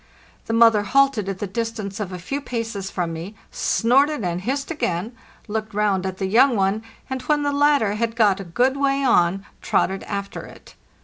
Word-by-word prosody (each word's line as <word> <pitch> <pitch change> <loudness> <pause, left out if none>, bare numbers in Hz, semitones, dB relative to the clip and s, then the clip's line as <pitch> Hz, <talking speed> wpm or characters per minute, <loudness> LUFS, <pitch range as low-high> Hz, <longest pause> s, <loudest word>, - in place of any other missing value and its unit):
The 225 - -2
moth 230 0 +6
er 210 - +2
halted 250 -2 +2
at 195 - -3
the 205 - -3
distance 215 -1 -4
of 200 -3 -4
a 180 - -5
few 275 +11 -4
paces 225 -7 -4
from 175 -4 -3
me, 170 +6 -7 0.2
snorted 270 +2 +2
and 175 0 -2
hissed 275 - -2
again, 215 - -2 0.3
looked 215 0 -4
round 200 -3 +1
at 190 0 -5
the 195 - -2
young 240 +6 +4
one, 195 +1 +1 0.3
and 260 -1 -4
when 295 +2 +1
the 285 - +1
latter 285 -7 +3
had 225 +1 -2
got 210 -4 +3
a - - -5
good 245 +10 +1
way 275 0 +1
on 195 -5 +2 0.2
trotted 190 +1 0
after 200 -1 -5
it. - - -14
215 Hz, 195 wpm, -22 LUFS, 195-260 Hz, 0.3 s, moth